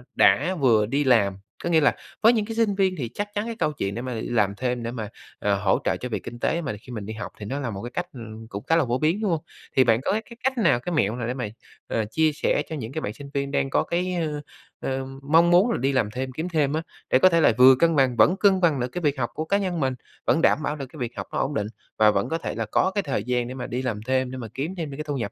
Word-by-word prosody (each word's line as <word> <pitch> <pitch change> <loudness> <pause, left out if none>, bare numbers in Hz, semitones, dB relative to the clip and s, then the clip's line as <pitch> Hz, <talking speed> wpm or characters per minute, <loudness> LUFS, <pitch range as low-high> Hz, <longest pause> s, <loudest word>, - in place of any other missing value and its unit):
đã 185 +1 +4
vừa 115 -6 +4
đi 140 +7 0
làm, 105 -7 +3 0.3
có - - -1
nghĩa 160 -2 +4
là 145 - +4 0.3
có 220 - +7
những 220 -3 +3
cái 225 0 -5
sinh 225 -3 +2
viên 190 -2 +2
thì 120 -6 -3
chắc 205 0 -3
chắn 205 +1 -1
cái 230 -1 -4
câu 155 -8 0
chuyện 100 -6 -3
để 120 - -3
mà 130 -1 -4
đi - - -4
làm 105 -4 +2
thêm 125 -1 -2
để 115 - -3
mà, 110 -4 -5 0.3
ờ, 100 -1 +1
hỗ 100 -1 +2
trợ 95 - 0
cho 125 +6 -5
việc 110 - -3
kinh 120 0 -8
tế 170 +7 0
mà 140 -8 -3
khi - - -12
mình 105 -3 -5
đi 110 - -5
học 110 -1 -6
thì 105 - -6
nó 135 +6 -3
là 125 - -3
một 100 - -6
cái 120 - -6
cách, 180 +5 -2
ừ, 130 - -9 0.3
cũng 100 - -6
khá 160 +4 +2
là 165 -4 +3
phổ 120 +1 0
biến, 160 +9 +1
đúng 200 -5 +1
hông? 160 - 0 0.3
Thì 130 - +6
bạn 115 -1 +3
có - - 0
cái 220 +3 -3
cách 265 0 +1
nào, 165 - +3
cái 175 +8 -4
mẹo 110 -5 +2
nào 120 -2 -3
để 125 - -1
mà, 125 -4 -3 0.4
ờ, 110 -2 -1
chia 155 +8 +2
sẻ 150 - +1
cho 160 - -4
những 120 -5 -5
cái 155 +3 -3
bạn 105 - -3
sinh 140 +5 -10
viên 140 0 -2
đang 135 - 0
có - - +2
cái, 180 +1 -1
ờ, 155 -3 -2 0.4
ờ, 135 0 -2 0.2
mong 165 +5 +4
muốn 195 +7 +5
là - - 0
đi 135 +2 +1
làm 115 -6 +1
thêm 130 +2 -4
kiếm 160 +7 -4
thêm 150 -4 +1
á, 160 - 0 0.3
để 130 - +4
có 185 - +7
thể 165 -2 +3
là 135 - +5
vừa 130 +1 +8
cân 165 +4 +3
bằng 130 -3 +3
vẫn 180 - +5
cân 195 -3 +4
bằng 160 -6 +3
được 125 - 0
cái 180 +8 -5
việc 145 -3 0
học 120 - 0
của 155 - -3
cá 200 - +2
nhân 185 -4 -2
mình, 130 -3 +1 0.3
vẫn 165 - +3
đảm 155 - +3
bảo 150 - -1
được 140 -3 -5
cái 155 - -13
việc 120 -1 -4
học - - -4
nó - - -3
ổn 140 - 0
định 105 -5 -1 0.3
và 110 -1 +6
vẫn 120 - -1
có 165 - 0
thể 165 - -5
là 115 -1 -2
có 185 - +3
cái 205 - +2
thời 140 - -2
gian 125 -1 0
để 125 - -6
mà 125 -2 -5
đi 125 +2 -3
làm 115 -5 -2
thêm 130 +1 0
để 130 - -6
mà 120 - -6
kiếm 155 +8 -3
thêm 160 -5 -4
được 135 - -7
cái 155 - -3
thu 145 -3 -3
nhập 105 -4 -3
135 Hz, 320 wpm, -25 LUFS, 120-165 Hz, 0.4 s, vừa